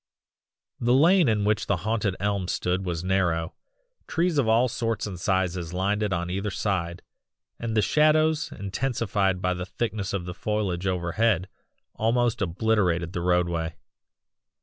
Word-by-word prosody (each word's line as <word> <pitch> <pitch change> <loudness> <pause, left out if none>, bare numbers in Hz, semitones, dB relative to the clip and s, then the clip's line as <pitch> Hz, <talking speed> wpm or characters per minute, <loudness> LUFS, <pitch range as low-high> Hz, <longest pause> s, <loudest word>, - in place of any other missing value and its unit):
"The 120 +1 +3
lane 165 +1 +5
in 105 -2 +1
which 110 +1 +1
the 100 - +2
haunted 110 -4 0
elm 100 -2 -1
stood 90 +1 -1
was 85 -1 -2
narrow, 90 -3 0 0.5
trees 170 -2 +1
of 125 - +1
all 115 +3 +4
sorts 115 -2 -2
and 95 -4 -6
sizes 90 -3 -1
lined 100 +3 0
it 105 -2 0
on 85 -1 -2
either 100 +3 -2
side, 90 -4 -2 0.6
and 115 -1 -2
the 105 - +4
shadows, 155 +2 +3
intensified 100 -3 -1
by 90 0 +2
the 90 0 -4
thickness 105 -2 -3
of 95 -3 -3
the 90 - -5
foliage 95 -2 -2
overhead, 95 +1 +1 0.4
almost 120 0 +1
obliterated 90 -3 +1
the 90 - -2
roadway. 85 -2 0
100 Hz, 150 wpm, -26 LUFS, 90-115 Hz, 0.6 s, lane